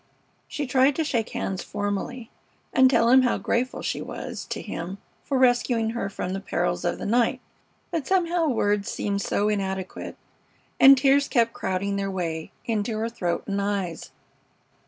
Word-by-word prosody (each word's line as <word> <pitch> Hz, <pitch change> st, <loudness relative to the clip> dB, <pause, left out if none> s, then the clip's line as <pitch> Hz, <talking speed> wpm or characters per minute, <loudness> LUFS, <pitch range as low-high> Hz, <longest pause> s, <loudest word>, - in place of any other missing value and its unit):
She 290 Hz, -, -3 dB
tried 265 Hz, +2 st, +3 dB
to 320 Hz, -, 0 dB
shake 235 Hz, -7 st, -1 dB
hands 190 Hz, -1 st, -3 dB
formally 205 Hz, +4 st, -4 dB, 0.4 s
and 260 Hz, 0 st, +6 dB
tell 235 Hz, -2 st, +3 dB
him 260 Hz, +1 st, +7 dB
how 250 Hz, -, +2 dB
grateful 250 Hz, +2 st, -1 dB
she -, -, -2 dB
was -, -, -6 dB
to -, -, -5 dB
him 175 Hz, +4 st, -5 dB, 0.3 s
for 275 Hz, -, -1 dB
rescuing 245 Hz, -3 st, +2 dB
her 230 Hz, -4 st, -3 dB
from 185 Hz, -1 st, -4 dB
the 195 Hz, -, -2 dB
perils 175 Hz, -2 st, -1 dB
of 175 Hz, -, -1 dB
the -, -, -6 dB
night, 240 Hz, +4 st, +2 dB, 0.5 s
but 325 Hz, -6 st, -2 dB
somehow 350 Hz, -3 st, +2 dB
words 205 Hz, -6 st, +1 dB
seemed 200 Hz, -1 st, -2 dB
so 205 Hz, +1 st, 0 dB
inadequate, 190 Hz, -3 st, -3 dB, 0.6 s
and 270 Hz, 0 st, +9 dB
tears 275 Hz, +1 st, +4 dB
kept 230 Hz, -2 st, +2 dB
crowding 195 Hz, +1 st, -2 dB
their 195 Hz, 0 st, -2 dB
way 165 Hz, -4 st, -3 dB
into 220 Hz, -1 st, -1 dB
her 225 Hz, +1 st, -1 dB
throat 175 Hz, -7 st, -2 dB
and 200 Hz, 0 st, -1 dB
eyes. 195 Hz, -5 st, -3 dB
220 Hz, 165 wpm, -25 LUFS, 195-255 Hz, 0.6 s, and